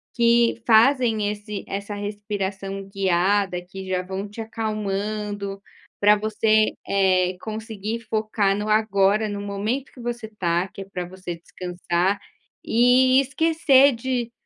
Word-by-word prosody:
que 235 Hz, 0 st, +3 dB
fazem 225 Hz, -2 st, +4 dB
esse 210 Hz, -1 st, -6 dB
essa 200 Hz, +1 st, -5 dB
respiração 200 Hz, -1 st, -4 dB
guiada, 190 Hz, -1 st, +1 dB
que 190 Hz, +1 st, -9 dB
já 185 Hz, -1 st, 0 dB
vão 190 Hz, +2 st, -5 dB
te 210 Hz, +3 st, -8 dB
acalmando, 210 Hz, -2 st, -3 dB, 0.4 s
pra 210 Hz, +1 st, +6 dB
você, 215 Hz, 0 st, +2 dB, 0.2 s
eh, 185 Hz, -2 st, +2 dB
conseguir 220 Hz, 0 st, -5 dB
focar 215 Hz, -2 st, 0 dB
no 210 Hz, +1 st, -3 dB
agora, 215 Hz, 0 st, +2 dB
no 205 Hz, 0 st, -4 dB
momento 210 Hz, +7 st, -3 dB
que 250 Hz, -, -12 dB
você 240 Hz, -2 st, -4 dB
tá, 180 Hz, -4 st, -1 dB
que 195 Hz, -, -10 dB
é -, -, -7 dB
para 180 Hz, -2 st, -5 dB
você 185 Hz, -1 st, -7 dB
descansar, 180 Hz, +2 st, -2 dB, 0.4 s
e 255 Hz, +2 st, +4 dB
esquecer 280 Hz, -1 st, +4 dB
de 240 Hz, -1 st, -2 dB
205 Hz, 130 wpm, -23 LUFS, 195-225 Hz, 0.4 s, pra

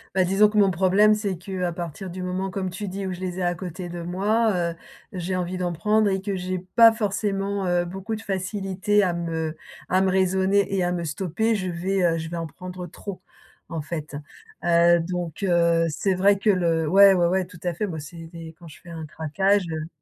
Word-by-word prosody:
Bah, 190 Hz, -, +4 dB
disons 195 Hz, +3 st, +4 dB
que 215 Hz, -, -3 dB
mon 195 Hz, -2 st, +5 dB
problème, 195 Hz, +4 st, +4 dB
c'est 205 Hz, -4 st, -2 dB
qu'à 180 Hz, -1 st, -3 dB
partir 175 Hz, +2 st, -6 dB
du 185 Hz, +1 st, -6 dB
moment, 185 Hz, +1 st, -2 dB
comme 185 Hz, 0 st, -3 dB
tu 200 Hz, +3 st, -6 dB
dis, 195 Hz, +1 st, -4 dB
où 190 Hz, -, -3 dB
je 180 Hz, -, -8 dB
les 185 Hz, 0 st, -4 dB
ai -, -, -1 dB
à 175 Hz, 0 st, +1 dB
côté 175 Hz, +1 st, -6 dB
de 175 Hz, 0 st, -6 dB
moi, 210 Hz, +6 st, +1 dB, 0.2 s
heu, -, -, -10 dB, 0.4 s
j'ai 185 Hz, 0 st, -3 dB
envie 180 Hz, 0 st, -2 dB
d'en 175 Hz, -1 st, -2 dB
prendre 210 Hz, +5 st, +2 dB
et 190 Hz, 0 st, -1 dB
que 200 Hz, -1 st, -3 dB
j'ai 185 Hz, 0 st, -3 dB
pas 225 Hz, +5 st, +6 dB
forcément, 200 Hz, -2 st, -1 dB
heu, 175 Hz, 0 st, +1 dB
beaucoup 195 Hz, +5 st, -5 dB
de 220 Hz, -, -8 dB
facilité 195 Hz, +1 st, 0 dB
à 180 Hz, -, +1 dB
me 165 Hz, -2 st, -3 dB, 0.3 s
à 185 Hz, +1 st, +3 dB
me 190 Hz, -, +2 dB
raisonner 190 Hz, +1 st, +2 dB
et 190 Hz, -, +1 dB
à 175 Hz, -, 0 dB
me 175 Hz, -1 st, -2 dB
stopper, 190 Hz, +8 st, -1 dB
je 185 Hz, -3 st, -2 dB
vais, 185 Hz, +3 st, -1 dB
heu, 165 Hz, -1 st, +2 dB
je 160 Hz, 0 st, -5 dB
vais 170 Hz, -, -4 dB
en 165 Hz, -, -3 dB
prendre 180 Hz, +2 st, -8 dB
trop, 190 Hz, +3 st, -8 dB, 0.5 s
en 165 Hz, -2 st, -3 dB
fait. 155 Hz, -1 st, -6 dB, 0.5 s
Heu, 170 Hz, 0 st, +5 dB
donc 175 Hz, +1 st, -4 dB
heu, 170 Hz, -2 st, +3 dB
c'est 190 Hz, +6 st, 0 dB
vrai 195 Hz, +2 st, +3 dB
que 210 Hz, -, +1 dB
le 165 Hz, -4 st, +2 dB
ouais, 195 Hz, +3 st, +7 dB
ouais, 175 Hz, -2 st, +3 dB
ouais, 185 Hz, +1 st, +1 dB
tout 180 Hz, -2 st, -14 dB
à 175 Hz, -1 st, -1 dB
fait. 210 Hz, +6 st, -2 dB
Moi, 160 Hz, -4 st, -5 dB
c'est 165 Hz, +3 st, -9 dB
des 165 Hz, -1 st, -10 dB
quand 170 Hz, -, -12 dB
je 155 Hz, -, -13 dB
fais 175 Hz, -, -14 dB
un 165 Hz, -2 st, -6 dB
craquage, 190 Hz, +7 st, +1 dB
heu 155 Hz, 0 st, -4 dB
185 Hz, 230 wpm, -24 LUFS, 170-195 Hz, 0.5 s, ouais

